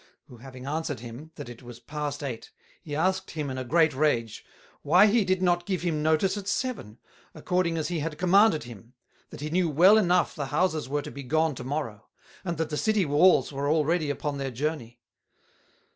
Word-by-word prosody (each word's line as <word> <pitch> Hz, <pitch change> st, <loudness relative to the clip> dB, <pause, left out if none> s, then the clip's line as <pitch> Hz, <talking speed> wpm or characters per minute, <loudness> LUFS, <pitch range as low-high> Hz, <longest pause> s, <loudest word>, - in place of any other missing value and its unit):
who 125 Hz, -, -15 dB
having 130 Hz, +1 st, -11 dB
answered 150 Hz, -3 st, -3 dB
him, 120 Hz, +6 st, -9 dB
that -, -, -8 dB
it 120 Hz, 0 st, -11 dB
was 120 Hz, -1 st, -11 dB
past 145 Hz, +3 st, -5 dB
Eight, 125 Hz, -5 st, -6 dB, 0.3 s
he 150 Hz, -4 st, -6 dB
asked 185 Hz, +5 st, 0 dB
him 150 Hz, -4 st, -4 dB
in 130 Hz, -, -4 dB
a -, -, -3 dB
great 160 Hz, +4 st, +3 dB
Rage, 125 Hz, -6 st, 0 dB, 0.4 s
Why 175 Hz, +7 st, +5 dB
he 215 Hz, +1 st, +3 dB
did 185 Hz, -1 st, 0 dB
not 175 Hz, -1 st, +1 dB
give 185 Hz, -3 st, -2 dB
him 160 Hz, -4 st, -1 dB
notice 160 Hz, +5 st, +2 dB
at 200 Hz, -1 st, -7 dB
Seven, 200 Hz, -, -3 dB, 0.4 s
according 180 Hz, -2 st, 0 dB
as 160 Hz, -, -2 dB
he 175 Hz, -2 st, -2 dB
had 150 Hz, 0 st, -4 dB
commanded 185 Hz, -, +4 dB
him; 120 Hz, +1 st, -13 dB, 0.3 s
that -, -, -10 dB
he 150 Hz, +1 st, -4 dB
knew 175 Hz, 0 st, +1 dB
well 185 Hz, +9 st, +6 dB
enough 180 Hz, -3 st, +2 dB
the 145 Hz, -2 st, -4 dB
Houses 155 Hz, -2 st, 0 dB
were 145 Hz, +1 st, -1 dB
to -, -, -8 dB
be 140 Hz, -, -8 dB
gone 155 Hz, +4 st, +1 dB
to 125 Hz, -, -8 dB
Morrow; 125 Hz, -6 st, -4 dB, 0.4 s
and 170 Hz, -4 st, -3 dB
that 160 Hz, -1 st, -2 dB
the 150 Hz, -, -2 dB
City 215 Hz, -1 st, +1 dB
Walls 145 Hz, -1 st, +4 dB
were 140 Hz, +1 st, -2 dB
already 155 Hz, 0 st, +1 dB
upon 145 Hz, 0 st, -3 dB
their 135 Hz, -1 st, -2 dB
Journey? 125 Hz, -2 st, -4 dB
155 Hz, 205 wpm, -27 LUFS, 135-175 Hz, 0.4 s, well